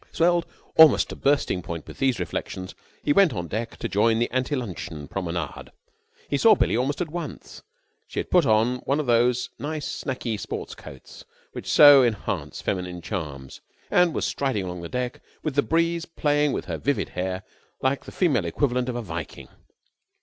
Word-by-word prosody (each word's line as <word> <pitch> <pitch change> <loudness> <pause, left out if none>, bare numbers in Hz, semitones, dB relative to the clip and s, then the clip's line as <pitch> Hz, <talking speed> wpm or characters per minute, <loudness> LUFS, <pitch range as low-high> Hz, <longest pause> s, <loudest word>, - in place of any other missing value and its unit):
Swelled 170 0 +2 0.3
almost 160 -4 +7
to - - -6
bursting 140 -9 +1
point 85 -2 -6
with - - -12
these 130 -3 +1
reflections, 95 -1 -4 0.3
he 145 - +3
went 195 -5 +5
on 90 -4 -4
deck 115 +6 -4
to - - -3
join 110 +3 +2
the 120 - 0
ante 130 +3 0
luncheon 85 - -5
promenade. 85 -4 -4 0.6
He 140 - 0
saw 220 +4 +7
Billie - - +1
almost 135 +7 0
at 165 -4 -3
once. 170 -2 -7 0.5
She - - -11
had - - -5
put - - +5
on 110 +3 +3
one 140 +3 -1
of 150 - -1
these 120 +1 +2
nice 150 +1 -4 0.2
sacky 120 -5 -3
sport - - -5
coats 65 - -12 0.3
which - - -7
so 145 -3 +9
enhance 115 -4 -2
feminine 90 -2 -3
charms, 75 -8 -6 0.3
and 180 -2 +4
was - - 0
striding 135 -8 -1
along 90 -1 -5
the 85 - -7
deck 125 0 -3 0.2
with 155 - -2
the 145 - +3
breeze 165 +2 0
playing 150 -3 +1
in - - -3
her - - -5
vivid 140 -7 -1
hair 95 +1 -3 0.4
like 135 +1 0
the - - -9
female 140 - +1
equivalent 125 - 0
of 125 - -3
a 120 - -3
Viking. 85 -4 -7
125 Hz, 180 wpm, -25 LUFS, 95-145 Hz, 0.6 s, so